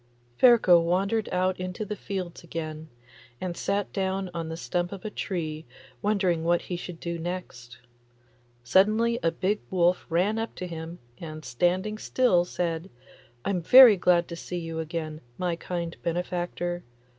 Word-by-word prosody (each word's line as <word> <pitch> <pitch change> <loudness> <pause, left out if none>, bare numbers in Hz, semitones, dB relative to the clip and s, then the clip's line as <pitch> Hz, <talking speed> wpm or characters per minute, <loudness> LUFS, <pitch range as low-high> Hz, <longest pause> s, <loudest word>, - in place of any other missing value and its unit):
Ferko 220 - +6
wandered 195 +6 0
out 185 0 0
into 185 +3 -4
the 210 +1 -4
fields 185 -5 -5
again, 160 -2 -6 0.5
and 180 -2 -4
sat 200 +2 -2
down 190 -1 -1
on 165 -2 -4
the 165 - -5
stump 175 0 -2
of 195 -1 -8
a 215 - -3
tree 160 -6 -4 0.4
wondering 190 -5 +1
what 175 +1 +2
he 180 - -4
should 175 -1 -7
do 170 -1 -4
next. 160 -9 -6 0.9
Suddenly 215 - +3
a 165 - +3
big 190 +5 -1
wolf 180 -1 +2
ran 190 +7 +1
up 225 - -4
to 185 - -5
him, 165 0 -7 0.2
and 155 -2 -8
standing 180 - 0
still 190 -11 +2
said, 170 0 -3 0.6
'I'm 190 -3 0
very 250 +5 +9
glad 175 -1 +3
to 170 - -5
see 180 +1 -6
you 165 -1 -4
again, 160 -1 -4 0.2
my 180 -2 -1
kind 170 -1 -4
benefactor. 175 0 -2
175 Hz, 155 wpm, -27 LUFS, 165-190 Hz, 0.9 s, very